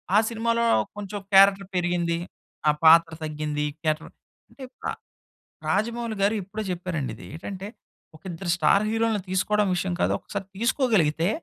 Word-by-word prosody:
ఆ - - +7
సినిమాలో 230 +1 0 0.3
కొంచెం 205 0 -5
క్యారెక్టర్ 195 0 +6
పెరిగింది. 175 -1 0 0.5
ఆ - - +7
పాత్ర 165 +1 +7
తగ్గింది 150 -1 -2 0.2
క్యారెక్టర్. 155 0 -1 0.4
అంటే 275 - -12 0.2
ప - - -23 0.9
రాజమౌళి 230 +2 -1
గారు 205 +3 +3
ఎప్పుడో 210 +4 -6
చెప్పారండి 170 -9 -3
ఇది. - - -12
ఏటంటే 190 +3 -7 0.5
ఒక - - -22
ఇద్దరు 175 +1 -4
స్టార్ 175 +5 +4
హీరోలని 225 -2 0
తీసుకోవడం 205 +2 +1
విషయం 180 0 -1
కాదు. - - +2
ఒకసారి 195 -2 -6
తీసుకోగలిగితే 200 - +2
190 Hz, 135 wpm, -25 LUFS, 165-215 Hz, 0.9 s, ఆ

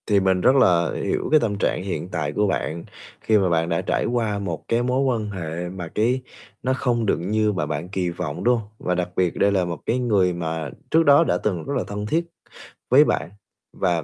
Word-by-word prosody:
Thì 105 -2 +4
mình 95 -1 +2
rất 130 - +5
là 85 -10 +4
hiểu - - -1
cái 155 - +6
tâm 105 -7 -1
trạng 95 - 0
hiện 95 -2 -4
tại 75 -5 -2
của 105 +6 +1
bạn, 85 -3 -2 0.4
khi 110 - +3
mà 95 -3 +2
bạn 85 0 +1
đã 85 - 0
trải - - -1
qua 115 -4 -1
một 90 -5 -4
cái 115 +1 +1
mối 125 +2 +1
quan 120 -6 0
hệ 90 -2 -5
mà 90 -2 -6
cái 120 +4 +1 0.4
nó 130 - +1
không 120 -3 0
được - - +2
như 105 +5 0
mà 95 -7 -2
bạn 75 +4 -4
kỳ 95 -2 -1
vọng, 75 -4 -5
đúng 125 0 +4
không? 105 - -10
Và 90 - -1
đặc 90 0 -1
biệt 90 -2 +1
đây 100 - +3
là 95 -3 +1
một 85 -3 -4
cái 125 - 0
người 100 -7 +2
mà 80 -2 -3 0.2
trước 165 +1 +5
đó 145 +1 +6
đã - - +1
từng 90 -6 -2
rất - - -3
là - - 0
thân 105 0 -4
thiết 165 +10 0 0.6
với - - +7
bạn, 85 - -1 0.4
và 85 -3 0
95 Hz, 235 wpm, -23 LUFS, 85-115 Hz, 0.6 s, với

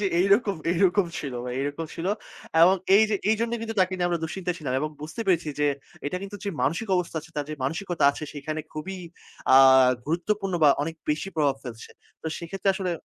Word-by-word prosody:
যে 205 - +1
এইরকম, 200 0 +3 0.2
এইরকম 185 +1 +3
ছিলো 135 -4 -5
ভাই 125 0 -4
এরকম 145 +3 -3
ছিল। 165 - -4 0.6
এবং 185 +3 +7 0.2
এই 215 - +6
যে 210 - +2 0.2
এই 220 - +3
জন্যেই 235 0 -1
কিন্তু 225 -1 -5
তাকে 185 0 +2
নিয়ে 175 -1 0
আমরা 170 -2 -1
দুঃশ্চিন্তায় 180 +1 -3
ছিলাম 140 -5 -3
এবং 155 - -1
বুঝতে 160 +10 -7
পেরেছি 170 -4 +2
যে 145 - +3 0.4
এটা 180 - -2
কিন্তু 200 +1 -7
যে 200 - -1
মানসিক 165 +11 0
অবস্থা 175 -2 -2
আছে 160 - -16
তার 145 - -1
যে - - -3
মানসিকতা 165 +5 -1
আছে, 145 - -7
সেইখানে 155 +2 -4
খুবই 155 +5 -5 0.6
আ - - +9 0.5
গুরুত্বপূর্ণ 190 +4 -1
বা - - +8
অনেক 165 +2 -3 0.2
বেশি 155 +6 -1
প্রভাব 145 -3 +2
ফেলছে। 115 -3 -9 0.3
তো - - -5
সেক্ষেত্রে 195 +4 -3
আসলে 190 -2 -2
175 Hz, 200 wpm, -26 LUFS, 155-195 Hz, 0.6 s, আ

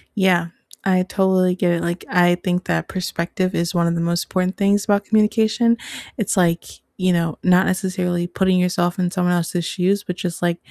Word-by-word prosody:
Yeah, 185 -4 +2 0.4
I 185 -1 +2
totally 185 -1 +1
get 180 -1 +1
it, 170 - -1
like, 170 +1 -3
I 175 -2 +4
think 180 0 -2
that 80 -1 -1
perspective 185 0 -3
is 170 +1 -1
one 170 -1 +2
of 170 - 0
the 170 - -1
most 170 +1 0
important 185 0 -2
things 200 0 +2
about 205 -1 +1
communication. 220 +2 +2 0.4
It's 215 -1 -1
like, 170 -2 +1 0.3
you 185 -1 +1
know, 165 -2 -1
not 185 0 +4
necessarily 180 -2 -1
putting 185 0 +1
yourself 175 0 0
in 180 - +1
someone 180 -1 0
else's 175 0 -1
shoes, 195 +3 0
but 180 -3 -5
just, 175 -2 -4
like, 175 -1 0
180 Hz, 190 wpm, -20 LUFS, 175-190 Hz, 0.4 s, I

